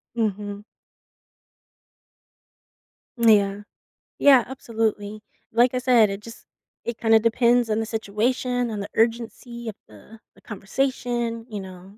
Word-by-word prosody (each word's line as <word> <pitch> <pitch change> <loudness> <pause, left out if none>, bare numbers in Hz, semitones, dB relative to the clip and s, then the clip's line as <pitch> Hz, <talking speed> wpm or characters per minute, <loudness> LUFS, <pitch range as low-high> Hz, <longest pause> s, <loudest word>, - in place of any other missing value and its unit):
Mhm. 205 -2 -2 2.6
Mm, 230 -1 +6
yeah. 200 0 -2 0.6
Yeah 270 -4 +6
absolutely. 220 -4 -3 0.3
Like 240 +3 +3
I - - 0
said, 245 -4 +4
it 195 +1 -5
just 230 +1 -12 0.4
it 235 -1 -4
kinda 225 -1 +4
depends 235 +1 +2
on 215 0 +1
the 225 - -1
situation 235 +3 -1
and 210 -2 -4
the 200 - -6
urgency 235 +1 -1
of 215 - -8
the 110 - -16 0.2
the - - -21
conversation, 235 +2 -2
you 210 -2 -5
know, 190 +1 -12
225 Hz, 125 wpm, -24 LUFS, 210-240 Hz, 2.6 s, Mm